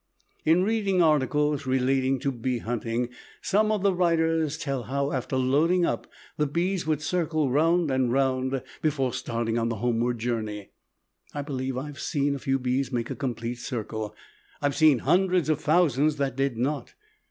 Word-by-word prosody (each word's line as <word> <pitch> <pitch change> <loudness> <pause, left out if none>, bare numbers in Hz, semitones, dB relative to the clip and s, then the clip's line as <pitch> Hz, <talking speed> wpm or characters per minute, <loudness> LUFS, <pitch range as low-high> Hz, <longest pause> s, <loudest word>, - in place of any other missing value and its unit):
In 165 +4 +4
reading 200 -3 +1
articles 150 -2 +2
relating 130 +1 +2
to 140 -1 0
bee 125 0 -2
hunting, 120 +1 -2 0.3
some 215 +2 +2
of 210 -3 0
the 200 -1 +3
writers 165 -3 +1
tell 140 -5 -2
how, 140 +3 -1
after 130 0 -2
loading 155 +8 +3
up, - - -2 0.3
the 150 - +1
bees 175 +3 -1
would 155 -1 0
circle 155 -5 0
round 165 +2 +3
and 130 -2 +1
round 130 0 0 0.2
before 140 -5 0
starting 115 0 -2
on 115 0 0
the 115 - -2
homeward 120 +1 0
journey. 110 -3 -3 0.6
I 145 - -2
believe 130 -3 -3
I 130 - -3
have 145 -1 -9
seen 145 -3 0
a 140 - -4
few 135 0 0
bees 130 0 -1
make 120 -2 -2
a - - -3
complete 120 -3 -4
circle. 110 -3 -4 0.4
I - - -3
have 145 - +1
seen 155 -3 +5
hundreds 180 -3 +3
of 155 0 +1
thousands 155 -2 +3
that 140 -3 -1
did 135 -3 0
not. 140 +4 -2
140 Hz, 175 wpm, -26 LUFS, 125-155 Hz, 0.6 s, seen